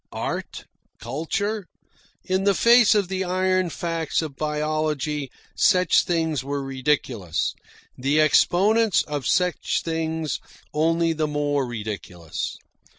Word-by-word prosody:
Art, - - -5 0.3
culture 180 - -3 0.6
in 190 0 0
the 200 -1 +3
face 235 0 +6
of 205 -3 +2
the 190 0 -2
iron 185 0 +1
facts 165 -1 -2
of 150 -4 -6
biology 150 -1 -1 0.3
such 180 -4 +4
things 160 -5 0
were 140 0 -3
ridiculous, 130 - -1 0.4
the 140 +4 +1
exponents 200 +7 +4
of 145 -5 -4
such 180 -1 +1
things 160 -1 -2 0.3
only 165 +2 +2
the 155 -1 -1
more 145 -2 0
ridiculous. 105 -8 -5
155 Hz, 110 wpm, -24 LUFS, 145-180 Hz, 0.6 s, face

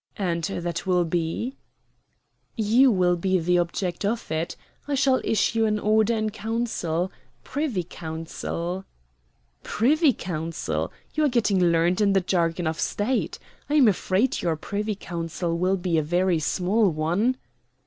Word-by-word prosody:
"And 170 -4 -1
that 175 -1 -3
will 180 -2 +3
be?" 170 - -2 1.0
"You 230 +4 +4
will 180 -5 +3
be 185 +2 +1
the 175 +1 +2
object 175 +2 -2
of 220 -3 -2
it. 165 +2 -2 0.3
I 290 - 0
shall 265 -1 +3
issue 225 +1 +2
an 215 -1 +1
order 215 +2 +2
in 215 -1 -1
council 205 -6 -2 0.3
Privy 270 - -2
Council." 170 +2 -5 0.8
"Privy 290 +7 +3
Council! 165 -6 -3 0.2
You 310 -1 +2
are - - +3
getting 210 -7 +2
learned 170 +3 +3
in 200 -1 +4
the 195 - +4
jargon 175 -1 0
of 160 0 -2
State. 240 +5 -1 0.3
I 295 - +1
am 275 -6 +6
afraid 200 +4 +1
your 170 -2 0
Privy 205 +6 -3
Council 170 -2 -3
will 185 +3 +1
be 175 -3 +1
a - - +2
very 175 +2 +1
small 190 +7 +2
one." 175 +11 0
185 Hz, 145 wpm, -25 LUFS, 170-220 Hz, 1.0 s, am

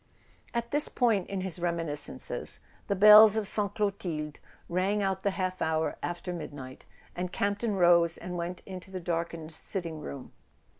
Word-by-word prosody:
At 235 0 -2
this 295 +1 +2
point 225 -7 +1
in 195 -1 -3
his 185 -2 -3
reminiscences 165 - -2 0.3
the 200 - 0
bells 210 +2 +9
of 220 -2 0
Sainte 205 -1 -1
Clotilde 185 -8 -3 0.3
rang 195 +4 0
out 190 -1 -1
the 200 - +1
half 185 -1 -3
hour 160 0 0
after 175 +1 -4
midnight, 140 -6 -8 0.3
and 180 0 -3
Campton 205 +3 -1
rose 170 -2 +4
and 180 +1 -6
went 175 +1 -4
into 185 -1 -9
the 190 -1 -5
darkened 170 -2 -3
sitting 165 -1 -3
room. 140 -3 -8
180 Hz, 155 wpm, -29 LUFS, 170-200 Hz, 0.3 s, bells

